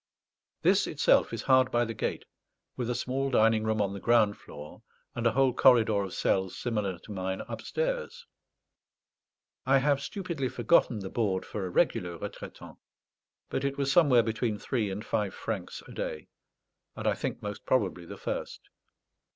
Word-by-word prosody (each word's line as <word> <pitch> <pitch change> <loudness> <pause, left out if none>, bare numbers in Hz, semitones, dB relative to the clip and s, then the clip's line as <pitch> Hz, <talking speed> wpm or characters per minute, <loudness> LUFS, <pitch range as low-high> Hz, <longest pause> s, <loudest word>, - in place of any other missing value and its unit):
This - - +4
itself - - +3
is 115 -2 -4
hard 130 -1 +4
by 120 0 +2
the 115 - -4
gate, 110 - -3 0.5
with 125 -1 -3
a 125 - 0
small 130 +2 -1
dining 110 -3 +3
room 110 0 0
on 100 -1 0
the 100 - -6
ground 110 -2 +3
floor 75 +1 -11 0.3
and 120 0 0
a - - +3
whole 135 0 +3
corridor 115 -6 +5
of 95 -2 -5
cells 95 -1 0
similar 105 -6 -2
to 100 - -13
mine 95 -1 -3
upstairs. 485 -1 -3 1.4
I 135 +1 +4
have 140 +1 +2
stupidly 170 -7 -3
forgotten 120 -1 +3
the 95 - -6
board 100 -5 0
for 100 -3 -4
a - - -5
regular 90 -1 +1
retraitant; - - -9 0.7
but 135 - -1
it 140 0 -1
was 140 -1 0
somewhere 135 -7 +5
between 110 -1 -1
three 110 -1 -1
and 100 +3 -5
five 105 -3 -1
francs 105 -6 -5
a - - -11
day, 75 - -5 0.7
and - - -6
I - - +3
think - - -4
most 105 0 -5
probably 95 -8 +1
the - - -8
first. - - -5
115 Hz, 165 wpm, -29 LUFS, 100-130 Hz, 1.4 s, corridor